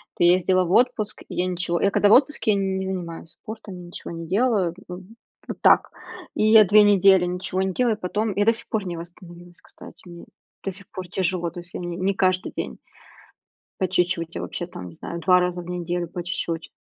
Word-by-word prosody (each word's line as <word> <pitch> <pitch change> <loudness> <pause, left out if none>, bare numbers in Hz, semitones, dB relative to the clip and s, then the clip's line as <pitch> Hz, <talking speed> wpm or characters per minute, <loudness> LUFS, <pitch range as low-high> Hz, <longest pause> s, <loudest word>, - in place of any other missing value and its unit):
ты - - 0
ездила 185 +1 +4
в 175 - -4
отпуск, 220 -2 +1
и - - -9
я 180 +1 0
ничего 175 -1 -1
я 200 - +4
когда 205 +1 +3
в - - +7
отпуске, 270 -4 +3
я 200 - +2
не 190 -1 -1
занимаюсь 170 -3 -6
спортом, 190 -3 -10
ничего 175 - -8
не 165 0 -7
делаю, 195 -3 +1
в 180 +1 -7 0.5
вот - - -7
так. - - +5 0.4
И - - 0
я 220 -1 +9
2 210 +2 +6
недели 195 -2 +5
ничего 185 +1 -3
не 190 -1 -1
делаю, 235 -2 +1
потом 210 +3 -2
я 205 - +2
до 230 - +5
сих 230 - -10
пор 210 -3 -2
не 175 -2 -4
восстановилась, 175 0 -12
кстати, - - -15
мне 170 -1 -11 0.4
до 195 - -2
сих 195 +1 -13
пор 185 -3 -7
тяжело, 175 -1 -1
то 175 - -8
есть 175 +1 -12
я - - -5
ни 175 - -5
не 190 +3 0
каждый 185 -1 0
день. - - -5 1.0
По 185 - +1
чуть-чуть, 175 -2 0
я - - -3
вообще, 175 - -5
там, 90 - -9
не 85 - -15
знаю, 170 - -7
2 180 +2 +4
раза 180 0 -1
в 175 - -11
неделю 175 0 -3
по 175 +1 -6
чуть-чуть. 170 -2 -4
185 Hz, 220 wpm, -23 LUFS, 175-200 Hz, 1.0 s, я